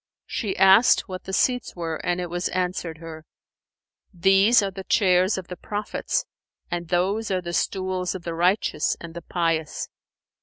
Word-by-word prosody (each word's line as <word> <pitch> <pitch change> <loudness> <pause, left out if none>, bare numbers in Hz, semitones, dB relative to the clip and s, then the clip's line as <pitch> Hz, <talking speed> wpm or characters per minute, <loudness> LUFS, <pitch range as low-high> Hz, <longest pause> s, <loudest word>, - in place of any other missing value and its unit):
She 205 -5 -3
asked 195 +5 +6
what 185 -2 -7
the 190 - -6
seats 250 +6 0
were 165 -2 -3
and 175 0 0
it 175 -1 -4
was 175 +1 -1
answered 180 -3 -2
her, 160 -1 -9 0.9
"These 195 +5 +4
are 195 - -2
the 190 0 -8
chairs 185 0 +3
of 185 -1 -6
the 180 - -6
prophets 205 +3 -3 0.5
and 175 -1 -3
those 190 +6 0
are 190 -1 +1
the 175 -1 -6
stools 185 0 -1
of 180 - -7
the 170 - -4
righteous 175 -2 +1
and 170 -1 -9
the 170 - -7
pious." 165 -2 -2
180 Hz, 165 wpm, -24 LUFS, 170-195 Hz, 0.9 s, asked